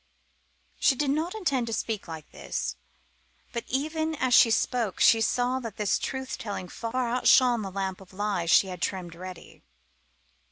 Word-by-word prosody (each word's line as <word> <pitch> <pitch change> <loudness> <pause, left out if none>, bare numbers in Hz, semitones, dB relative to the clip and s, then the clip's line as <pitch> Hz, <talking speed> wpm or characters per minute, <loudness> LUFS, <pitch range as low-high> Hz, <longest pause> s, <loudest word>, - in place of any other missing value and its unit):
She 265 - +3
had 290 -2 +2
not 320 +7 -1
intended 270 - -1
to - - 0
speak 220 -4 -3
like 160 -2 -9
this, - - -4 0.8
but 235 - -3
even 315 +4 -1
as 255 -3 0
she 230 - +7
spoke 225 -1 0
she 225 - +6
saw 245 +4 +1
that 230 -5 -7
this 210 -2 +1
truth 265 0 -4
telling 200 -4 -5
far 240 +2 -2
outshone 245 0 +4
the 195 - -4
lamp 190 0 -4
of 190 - -15
lies 200 -3 -2
she 195 - +6
had 180 -2 -7
trimmed 180 -3 -3
ready. 185 +1 -10
230 Hz, 165 wpm, -27 LUFS, 190-260 Hz, 0.8 s, she